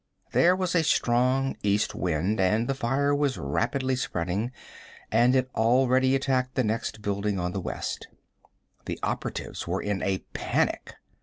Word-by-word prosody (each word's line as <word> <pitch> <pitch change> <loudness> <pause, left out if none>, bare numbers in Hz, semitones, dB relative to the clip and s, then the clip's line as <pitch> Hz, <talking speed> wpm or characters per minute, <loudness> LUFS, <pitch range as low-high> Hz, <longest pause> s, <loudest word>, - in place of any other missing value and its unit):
There 180 +2 +5
was 185 -2 -1
a 170 - +4
strong 130 0 +2
east 105 +1 +1
wind, 90 +4 -1
and 105 +5 +2
the 135 - +1
fire 135 +3 +1
was 145 -2 +1
rapidly 130 - 0
spreading, 100 -1 -2 0.6
and 120 +3 +4
had 130 -1 +2
already 130 +3 +3
attacked 130 -1 0
the 130 - +2
next 110 -1 -2
building 100 -1 -1
on 90 0 -1
the 95 - -3
west. - - -4 0.8
The - - -4
operatives - - -3
were - - -1
in 100 -2 -2
a 95 -1 -1
panic. - - -1
120 Hz, 150 wpm, -27 LUFS, 100-130 Hz, 0.8 s, There